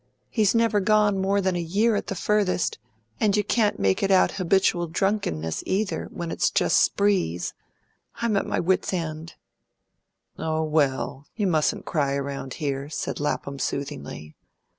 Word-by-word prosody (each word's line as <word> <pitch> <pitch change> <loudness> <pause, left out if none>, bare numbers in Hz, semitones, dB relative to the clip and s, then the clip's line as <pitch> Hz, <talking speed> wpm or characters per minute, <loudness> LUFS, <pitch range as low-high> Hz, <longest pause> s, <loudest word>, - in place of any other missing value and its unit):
He's 215 -2 +2
never 230 -2 +3
gone 210 0 +3
more 200 +1 +2
than 190 -1 0
a 175 - -1
year 205 +7 +2
at - - -2
the 195 - -3
furthest, 200 - 0 0.4
and 210 -1 +2
you 210 - +2
can't 210 0 +1
make 95 -1 +1
it 195 - +1
out 190 -1 +5
habitual 185 -2 +1
drunkenness, 160 - -1
either, 200 +2 -1
when 170 -1 -5
it's - - +1
just - - +3
sprees. 190 - +1 0.6
I'm 230 -2 0
at 200 - 0
my - - 0
wit's 185 +2 +1
end." 160 -1 -5 1.0
"Oh, 160 0 -1
well, 145 -2 0
you 210 - 0
mustn't 160 -5 +1
cry 140 -4 0
around 140 -2 -4
here," 140 -1 -3
said 150 - -4
Lapham 140 -1 -2
soothingly. 75 - -5
175 Hz, 155 wpm, -25 LUFS, 145-205 Hz, 1.0 s, out